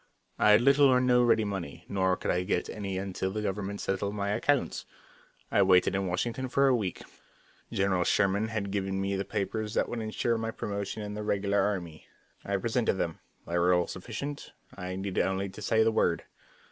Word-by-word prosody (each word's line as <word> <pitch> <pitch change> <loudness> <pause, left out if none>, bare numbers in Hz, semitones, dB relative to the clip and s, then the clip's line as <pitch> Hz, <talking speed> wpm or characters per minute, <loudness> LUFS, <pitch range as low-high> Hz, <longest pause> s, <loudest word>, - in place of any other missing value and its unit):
I - - +5
had 105 +2 +7
little 140 +2 +6
or 130 -1 +5
no 125 -1 +4
ready 115 -2 +4
money, 95 -8 -5
nor 95 -2 +1
could - - -1
I 90 - +1
get 90 -1 -1
any 100 -3 -4
until 95 0 -2
the 105 +2 -3
government 100 0 -3
settled 100 +1 -2
my 100 -1 -2
accounts. 125 +6 0 0.7
I - - +4
waited 95 -2 +4
in 95 0 -1
Washington 120 +8 -2
for 135 +2 +3
a 130 - +4
week. 100 -7 -3 0.7
General 95 -2 +1
Sherman 100 +3 +2
had 105 -3 -3
given 95 -1 -1
me 95 0 -1
papers 105 +1 -3
that - - +2
would 120 - -4
insure 115 +1 -1
my 115 0 -2
promotion 100 -1 -4
in 105 0 -5
the 105 - -4
regular 100 -1 +1
army. 90 -6 -3 0.4
I - - -1
presented - - +1
them; - - -3 0.3
they 85 +1 -1
were 90 +1 +4
all 90 -1 +2
sufficient; 140 +12 -6 0.2
I 90 0 -5
needed 95 0 -1
only 95 +1 -1
to - - -11
say 110 0 +3
the 115 - +3
word. 85 -6 +1
100 Hz, 195 wpm, -29 LUFS, 95-110 Hz, 0.7 s, had